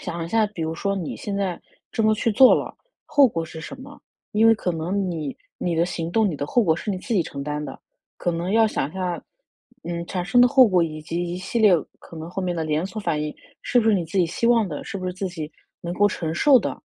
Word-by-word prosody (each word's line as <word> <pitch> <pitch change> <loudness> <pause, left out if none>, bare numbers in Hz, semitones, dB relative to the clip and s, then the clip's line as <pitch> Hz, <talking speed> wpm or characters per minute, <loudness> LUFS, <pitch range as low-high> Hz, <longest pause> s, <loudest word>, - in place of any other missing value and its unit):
想 170 0 -4
一 - - -6
下 220 +1 +2
比 190 -6 -6
如 160 +1 -2
说 200 +3 -1
你 180 -5 -4
现 205 - -5
在 190 -3 -2 0.3
这 225 - -1
么 215 0 +4
去 225 +2 0
做 260 +4 +7
了， - - -3 0.3
后 285 -2 +5
果 170 -9 -2
是 160 0 -9
什 260 +9 -8
么？ 280 +2 -12 0.3
因 220 +2 +4
为 225 - +7
可 185 - -2
能 180 +4 -2
你 155 -5 -4 0.2
你 175 -2 -1
的 165 +1 +2
行 170 -2 -4
动、 220 +1 +3
你 155 - -3
的 145 - -3
后 240 - +2
果 160 -5 +3
是 210 +4 -4
你 185 - -2
自 235 - -5
己 185 -5 +3
承 140 -2 -6
担 150 +1 -3
的， - - -8 0.4
可 175 - -1
能 170 +2 -3
要 225 0 +5
想 140 -9 -1
一 - - -15
下， 180 -2 -3 0.6
嗯， 170 0 -4
产 180 -1 -3
生 245 +6 +4
的 245 - +8
后 260 -1 +6
果 180 -3 +3
以 155 -2 -4
及 170 +2 -3
一 180 - -3
系 190 +5 -3
列 215 -4 +6 0.3
可 165 - -13
能 160 +1 -7
后 190 - -4
面 180 -1 -1
的 165 - -2
连 155 +3 -1
锁 215 +2 -6
反 155 -7 -1
应， 150 - -4 0.3
是 245 - +3
不 225 - +1
是 220 - +5
你 180 -4 0
自 165 +5 -7
己 175 - +5
希 200 +8 -1
望 230 -4 +4
的？ 150 - -6
是 - - -5
不 185 - -6
是 180 - -2
自 190 +1 -4
己 155 -4 -6 0.3
能 175 0 -4
够 205 +3 +4
承 165 -5 -2
受 270 +8 +6
的？ - - -4
180 Hz, 295 characters per minute, -23 LUFS, 165-215 Hz, 0.6 s, 的